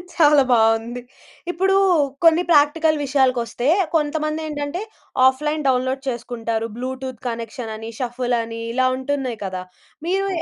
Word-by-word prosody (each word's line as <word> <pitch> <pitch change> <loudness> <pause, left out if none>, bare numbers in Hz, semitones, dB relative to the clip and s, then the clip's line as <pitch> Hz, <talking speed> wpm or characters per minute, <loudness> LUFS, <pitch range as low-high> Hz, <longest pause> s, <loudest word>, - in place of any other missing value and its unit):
చాలా 295 -4 +6
బాగుంది. 225 +1 +2 0.5
ఇప్పుడు 385 +3 +1 0.5
కొన్ని 330 +1 +5
ప్రాక్టికల్ 310 +1 +4
విషయాలకొస్తే 255 -3 +1 0.3
కొంతమందేంటంటే 305 +1 -2 0.5
ఆఫ్‌లైన్ 300 +3 0
డౌన్‌లోడ్ 260 +1 +1
చేసుకుంటారు. 230 -2 -3
బ్లూటూత్ 260 0 -5
కనెక్షన్ 230 0 -5
అని, 225 +1 -7
షఫుల్ 245 -1 -1
అని, 230 0 -7
ఇలా 255 +1 +2
ఉంటున్నాయి 260 -3 -3
కదా! 185 -1 -4 0.5
మీరు 390 +2 +1
260 Hz, 110 wpm, -21 LUFS, 240-300 Hz, 0.5 s, చాలా